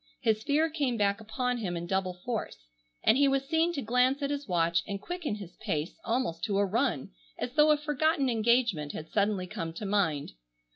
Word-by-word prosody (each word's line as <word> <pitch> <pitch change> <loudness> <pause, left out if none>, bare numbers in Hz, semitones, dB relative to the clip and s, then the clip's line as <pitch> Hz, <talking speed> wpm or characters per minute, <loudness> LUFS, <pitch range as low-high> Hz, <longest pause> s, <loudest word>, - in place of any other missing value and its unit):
His 215 -1 +1
fear 295 +6 +2
came 285 -7 -1
back 200 0 +1
upon 250 +3 -2
him 180 -6 -2
in 170 - -4
double 185 0 -1
force, 225 - -3 0.5
and 235 - +5
he 285 - +5
was 275 0 +1
seen 325 +3 +2
to 280 - -3
glance 250 +5 +2
at 280 - 0
his 285 -2 -3
watch 170 -2 +2
and 200 -1 -3
quicken 340 - -4
his 200 -4 -9
pace 155 - -3
almost 230 -8 -1
to 205 -3 0
a 200 - +3
run 225 - 0 0.3
as 250 - -4
though 300 +1 +5
a 300 - +5
forgotten 295 -1 +1
engagement 230 - +2
had 160 - -7
suddenly 200 -2 +1
come 165 -2 -5
to 205 - -6
mind. 190 -8 0
225 Hz, 200 wpm, -29 LUFS, 190-275 Hz, 0.5 s, and